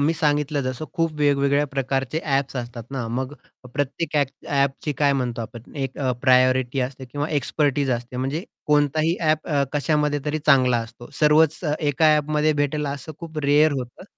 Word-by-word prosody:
मी 150 Hz, +3 st, +3 dB
सांगितलं 150 Hz, -1 st, +1 dB
जसं 130 Hz, +3 st, -3 dB
खूप 165 Hz, -2 st, 0 dB
वेगवेगळ्या 140 Hz, 0 st, +2 dB
प्रकारचे 135 Hz, +1 st, -2 dB
ॲप्स 135 Hz, -2 st, 0 dB
असतात 120 Hz, -1 st, -5 dB
ना, 130 Hz, -4 st, -3 dB
मग 130 Hz, +4 st, -3 dB, 0.4 s
प्रत्येक 145 Hz, +4 st, -2 dB
ॲ 145 Hz, -, +4 dB, 0.2 s
ॲपची 140 Hz, +1 st, 0 dB
काय 145 Hz, -1 st, +4 dB
म्हणतो 125 Hz, -3 st, -2 dB
आपण 115 Hz, +1 st, -11 dB
एक 135 Hz, -1 st, -4 dB, 0.2 s
प्रायोरिटी 130 Hz, 0 st, +3 dB
असते 130 Hz, +1 st, -4 dB
किंवा 145 Hz, +4 st, -4 dB
एक्सपर्टाइज 145 Hz, -1 st, 0 dB
असते 120 Hz, 0 st, -3 dB
म्हणजे 135 Hz, +7 st, -2 dB, 0.2 s
कोणताही 150 Hz, +3 st, +2 dB
ॲप 155 Hz, -1 st, +1 dB, 0.2 s
कशामध्ये 150 Hz, 0 st, +1 dB
तरी 150 Hz, +1 st, -1 dB
चांगला 130 Hz, -4 st, +5 dB
असतो. 115 Hz, +1 st, -8 dB
सर्वच 150 Hz, +1 st, +4 dB, 0.2 s
एका 155 Hz, +1 st, +3 dB
ॲपमध्ये 150 Hz, +1 st, +1 dB
भेटेल 145 Hz, 0 st, -1 dB
असं 140 Hz, +2 st, -5 dB
खूप 160 Hz, -2 st, -7 dB
रेअर 150 Hz, +2 st, +4 dB
होतं. 125 Hz, 0 st, -6 dB
145 Hz, 155 wpm, -23 LUFS, 130-150 Hz, 0.4 s, चांगला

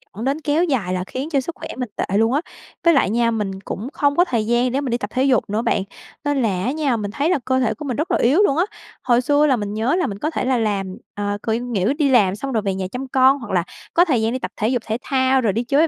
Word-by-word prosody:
dẫn 220 Hz, +4 st, -5 dB
đến 280 Hz, +4 st, 0 dB
kéo 305 Hz, +3 st, +1 dB
dài 235 Hz, -, 0 dB
là 180 Hz, 0 st, -1 dB
khiến 275 Hz, +5 st, -4 dB
cho 285 Hz, -, +2 dB
sức 335 Hz, +6 st, -6 dB
khỏe 320 Hz, -, -8 dB
mình 250 Hz, -3 st, -3 dB
tệ 195 Hz, -, -1 dB
luôn 225 Hz, +3 st, +3 dB
á, 290 Hz, -, +2 dB, 0.4 s
với 335 Hz, -1 st, +5 dB
lại 270 Hz, -8 st, +3 dB
nha, 230 Hz, +1 st, +2 dB
mình 195 Hz, -3 st, -3 dB
cũng 210 Hz, +4 st, -5 dB
không 285 Hz, 0 st, +1 dB
có 350 Hz, -, +5 dB
thời 235 Hz, -9 st, -1 dB
gian 240 Hz, +2 st, +2 dB
để 275 Hz, +3 st, 0 dB
mình 260 Hz, -4 st, -3 dB
đi 240 Hz, -, +1 dB
tập 205 Hz, -3 st, -5 dB
thể 260 Hz, +1 st, +1 dB
dục 255 Hz, -7 st, +2 dB
nữa 215 Hz, +2 st, 0 dB
bạn, 220 Hz, -4 st, 0 dB, 0.4 s
nên 290 Hz, -2 st, +1 dB
là 190 Hz, -5 st, 0 dB
á 255 Hz, -, +1 dB
nha, 280 Hz, -5 st, 0 dB
mình 205 Hz, -1 st, -4 dB
thấy 295 Hz, +7 st, 0 dB
là 365 Hz, -, +2 dB
cơ 260 Hz, 0 st, +2 dB
thể 220 Hz, -3 st, +1 dB
của 290 Hz, +7 st, -8 dB
mình 250 Hz, -4 st, -3 dB
rất 335 Hz, +5 st, -2 dB
là -, -, +3 dB
yếu 270 Hz, +9 st, +3 dB
luôn 285 Hz, -7 st, +2 dB
á. 350 Hz, -, +3 dB, 0.4 s
Hồi 240 Hz, -1 st, +3 dB
xưa 290 Hz, +3 st, +3 dB
là 275 Hz, -4 st, +4 dB
mình 205 Hz, -2 st, -4 dB
nhớ 230 Hz, +8 st, +1 dB
là 360 Hz, -, +1 dB
mình 200 Hz, -1 st, -6 dB
có 305 Hz, -, -1 dB
thể -, -, -2 dB
là 260 Hz, -1 st, +2 dB
làm, 200 Hz, -4 st, -1 dB, 0.2 s
ờ, 205 Hz, 0 st, -2 dB
cỡ 225 Hz, -, -2 dB
nghĩa 235 Hz, -1 st, 0 dB
đi 290 Hz, -2 st, +1 dB
làm 205 Hz, -7 st, +4 dB
xong 270 Hz, +5 st, -5 dB
rồi 225 Hz, -4 st, +1 dB
về 195 Hz, -2 st, -1 dB
nhà 190 Hz, -1 st, -3 dB
chăm 260 Hz, +2 st, -5 dB
con 265 Hz, +2 st, +4 dB
hoặc 235 Hz, -5 st, -8 dB
là 180 Hz, -2 st, +2 dB, 0.3 s
có 350 Hz, +2 st, +5 dB
thời 260 Hz, -9 st, +1 dB
gian 225 Hz, +2 st, 0 dB
đi 260 Hz, -, -2 dB
tập -, -, -5 dB
thể 220 Hz, 0 st, +1 dB
dục 245 Hz, -2 st, 0 dB
thể 220 Hz, +1 st, -1 dB
thao 260 Hz, -1 st, +2 dB
rồi 210 Hz, -5 st, +1 dB
đi 230 Hz, -, -1 dB
chơi 285 Hz, +6 st, +3 dB
250 Hz, 310 wpm, -21 LUFS, 215-280 Hz, 0.4 s, với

